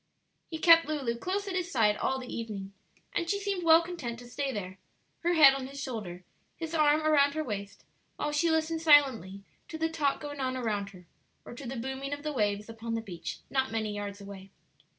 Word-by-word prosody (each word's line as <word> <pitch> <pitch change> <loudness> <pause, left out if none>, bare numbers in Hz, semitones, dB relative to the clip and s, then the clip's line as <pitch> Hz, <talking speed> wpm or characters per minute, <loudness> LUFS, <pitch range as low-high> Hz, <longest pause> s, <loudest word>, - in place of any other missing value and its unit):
He 320 - -4
kept 330 -1 +6
Lulu 275 -6 -1
close 385 +10 -3
at 385 - -3
his 360 -1 -1
side 215 -4 +3
all 265 +5 -1
the 255 -1 -7
evening, 200 -4 -6 0.4
and 340 -1 -1
she 400 - +1
seemed 400 -3 -2
well 330 0 +7
content 310 -10 -5
to 245 +1 -11
stay 275 +3 -3
there, 185 -4 -6 0.4
her 345 +1 +1
head 300 -5 +8
on 270 -1 -4
his 275 +1 -9
shoulder, 210 -10 -5 0.3
his 325 0 -5
arm 305 -1 +4
around 285 -2 +4
her 310 - -1
waist, 200 -6 -6 0.3
while 295 - -2
she 305 +3 +2
listened 320 0 0
silently 260 - +4 0.2
to 320 - -6
the 325 0 0
talk 300 -4 0
going 290 -1 -7
on 260 -1 -1
around 210 -5 -2
her 180 -2 -15 0.4
or - - -9
to 250 +2 -8
the 260 - -4
booming 265 +3 -4
of 285 0 -6
the 305 -1 -2
waves 210 -4 0
upon 225 0 -5
the 225 - -2
beach 180 -6 -7
not 265 -2 +1
many 220 -2 -2
yards 205 -1 -5
away. 195 -1 -10
265 Hz, 210 wpm, -29 LUFS, 215-315 Hz, 0.4 s, head